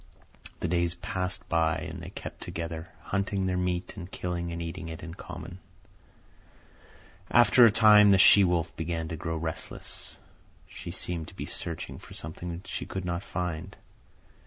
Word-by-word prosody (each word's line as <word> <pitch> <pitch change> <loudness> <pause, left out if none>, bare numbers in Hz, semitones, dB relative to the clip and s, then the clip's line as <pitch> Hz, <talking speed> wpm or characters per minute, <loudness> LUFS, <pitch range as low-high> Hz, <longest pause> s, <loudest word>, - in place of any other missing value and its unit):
The - - 0
days 85 0 +1
passed 90 +1 -3
by, 80 -1 +2
and - - -7
they - - -7
kept - - -8
together, 80 0 -5
hunting 100 0 -1
their 95 -1 0
meat 90 0 -1
and 90 -3 -7
killing 85 -1 -3
and 85 - -4
eating 85 0 -5
it 80 +1 -7
in 85 -1 -6
common. 90 +1 -8 1.7
After 120 0 +7
a 115 - +7
time 105 -1 +7
the 100 - +7
she 100 +1 +8
wolf 85 -2 +1
began 80 0 -3
to 80 - -3
grow 80 0 -3
restless. 80 0 -6 0.5
She - - -8
seemed 85 -3 -3
to - - -12
be - - -4
searching 85 -1 -4
for - - -12
something 85 +2 -6
that 85 +2 -6
she - - -4
could 95 -1 -4
not 85 0 -1
find. 90 0 -4
85 Hz, 165 wpm, -29 LUFS, 85-95 Hz, 1.7 s, she